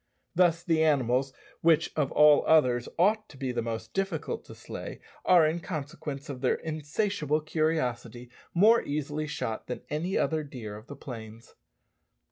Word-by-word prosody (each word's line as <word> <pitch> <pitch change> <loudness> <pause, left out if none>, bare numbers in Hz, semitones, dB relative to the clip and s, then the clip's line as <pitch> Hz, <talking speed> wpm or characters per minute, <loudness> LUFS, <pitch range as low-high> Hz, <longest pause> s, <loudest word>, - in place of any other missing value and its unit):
Thus 170 -1 +3
the 165 -2 +2
animals, 135 -3 +2 0.3
which 165 0 +3
of 145 -3 0
all 150 -1 +6
others 125 -6 +4
ought 210 +5 +2
to 140 - -14
be 130 -2 -2
the 120 -1 -1
most 115 -1 -5
difficult 195 -5 -2
to - - -11
slay, - - -8 0.3
are, 175 -3 +6
in 160 +2 0
consequence 150 -4 -6
of 130 -3 -6
their 130 - +2
insatiable 155 +1 -1
curiosity, 125 -7 -2 0.2
more 220 +6 +5
easily 150 +1 -3
shot 120 -7 -4
than 125 - -5
any 170 +6 -1
other 155 -1 0
deer 115 -7 -8
of 110 +2 -12
the 145 - -8
plains. 115 -4 -10
150 Hz, 155 wpm, -28 LUFS, 125-165 Hz, 0.3 s, all